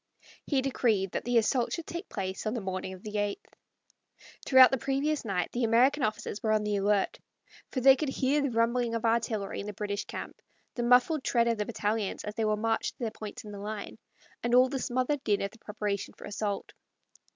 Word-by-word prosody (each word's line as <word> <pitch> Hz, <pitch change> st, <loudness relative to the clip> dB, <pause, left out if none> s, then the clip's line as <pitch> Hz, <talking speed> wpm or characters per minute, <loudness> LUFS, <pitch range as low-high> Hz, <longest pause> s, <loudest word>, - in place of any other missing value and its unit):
He 270 Hz, -3 st, +1 dB
decreed 220 Hz, -8 st, +1 dB
that -, -, -3 dB
the 245 Hz, 0 st, +2 dB
assault 235 Hz, +2 st, +2 dB
should 335 Hz, -, -4 dB
take 345 Hz, +3 st, -6 dB
place 190 Hz, +1 st, -4 dB
on 215 Hz, -, -1 dB
the -, -, -1 dB
morning 190 Hz, -1 st, -4 dB
of 185 Hz, -, -12 dB
the 210 Hz, 0 st, -3 dB
eighth. 205 Hz, 0 st, -3 dB, 0.9 s
Throughout 260 Hz, -1 st, +8 dB
the 265 Hz, -, 0 dB
previous 280 Hz, +4 st, 0 dB
night 190 Hz, -6 st, -1 dB
the 245 Hz, -, -2 dB
American 245 Hz, +6 st, +4 dB
officers 215 Hz, -3 st, -2 dB
were 220 Hz, -3 st, +1 dB
on 215 Hz, -1 st, +2 dB
the 210 Hz, -1 st, 0 dB
alert, 200 Hz, 0 st, +1 dB, 0.5 s
for 255 Hz, -, -2 dB
they 270 Hz, +1 st, +8 dB
could 295 Hz, +1 st, -2 dB
hear 275 Hz, +2 st, +1 dB
the 280 Hz, -, 0 dB
rumbling 230 Hz, 0 st, +1 dB
of 230 Hz, -, -2 dB
artillery 225 Hz, -3 st, 0 dB
in 200 Hz, -, -5 dB
the 210 Hz, -, -5 dB
British 205 Hz, 0 st, -3 dB
camp, -, -, -7 dB, 0.3 s
the 240 Hz, -, -3 dB
muffled 250 Hz, +5 st, +4 dB
tread 235 Hz, -1 st, +2 dB
of 230 Hz, -2 st, 0 dB
the 210 Hz, -, -1 dB
battalions 210 Hz, -2 st, -2 dB
as 210 Hz, -, -5 dB
they 220 Hz, 0 st, -1 dB
were 215 Hz, 0 st, +1 dB
marched 225 Hz, +1 st, -1 dB
to -, -, -45 dB
their 225 Hz, -, -1 dB
points 215 Hz, +3 st, -8 dB
in 210 Hz, -, -9 dB
the 200 Hz, -, -8 dB
line, 210 Hz, +1 st, -6 dB, 0.4 s
and 240 Hz, +1 st, +2 dB
all 255 Hz, +1 st, +6 dB
the 270 Hz, 0 st, -2 dB
smothered 255 Hz, +3 st, -1 dB
din 205 Hz, -2 st, +1 dB
of 200 Hz, -, -3 dB
the 230 Hz, -, -18 dB
preparation 210 Hz, -2 st, -4 dB
for -, -, -10 dB
assault. 205 Hz, -1 st, -3 dB
225 Hz, 220 wpm, -29 LUFS, 210-255 Hz, 0.9 s, Throughout